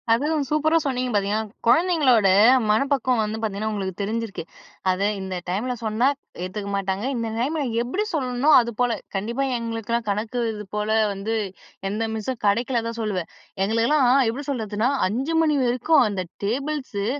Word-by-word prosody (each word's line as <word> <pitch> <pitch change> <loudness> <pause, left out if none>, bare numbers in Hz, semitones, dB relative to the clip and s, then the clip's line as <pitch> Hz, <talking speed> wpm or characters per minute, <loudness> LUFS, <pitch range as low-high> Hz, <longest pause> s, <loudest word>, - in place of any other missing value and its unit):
அதுவும் 290 +5 +2
சூப்பரா 310 +2 +2
சொன்னீங்க 255 -2 -1
பார்த்தீங்கன்னா, 205 +1 0
குழந்தைங்களோட 260 - +4 0.4
மனப்பக்குவம் 255 +1 +2
வந்து 215 +1 -3
பார்த்தீங்கன்னா, 215 0 -2
உங்களுக்கு 190 -3 -3
தெரிஞ்சிருக்கு. 220 -2 -3 0.5
அத 185 +1 -2 0.2
இந்த 190 -1 -4
டைம்ல 220 +8 -1
சொன்னா 220 +3 +1 0.4
ஏத்துக்க 200 +2 -5
மாட்டாங்க. 195 +2 -2
இந்த 230 -1 -2
டைம்ல 295 +5 0 0.2
எப்பிடி 260 - -1
சொல்லணுன்னோ! 260 -1 0
அதுபோல 235 0 -1 0.2
கண்டிப்பா 235 +7 -1
எங்களுக்கெல்லாம் 230 0 -3
கணக்கு 215 +4 -2
இதுபோல 210 0 -4 0.2
வந்து 200 +3 -3 0.6
எந்த 215 +3 -2
மிஸ்ஸும் 235 +3 -4
கிடைக்கல 235 +4 +2
தான் 230 0 -5
சொல்லுவேன். 195 -6 -2 0.3
எங்களுக்கெல்லாம் 230 +7 +2 0.2
எப்பிடி 270 +5 -4
சொல்றதுன்னா 220 -3 -1 0.2
5:00 260 +11 -2
மணி 310 -2 +2
வரைக்கும் 250 +6 +3
அந்த 200 -3 -2 0.2
டேபிள்ஸு 260 -3 -2
230 Hz, 135 wpm, -23 LUFS, 210-260 Hz, 0.6 s, குழந்தைங்களோட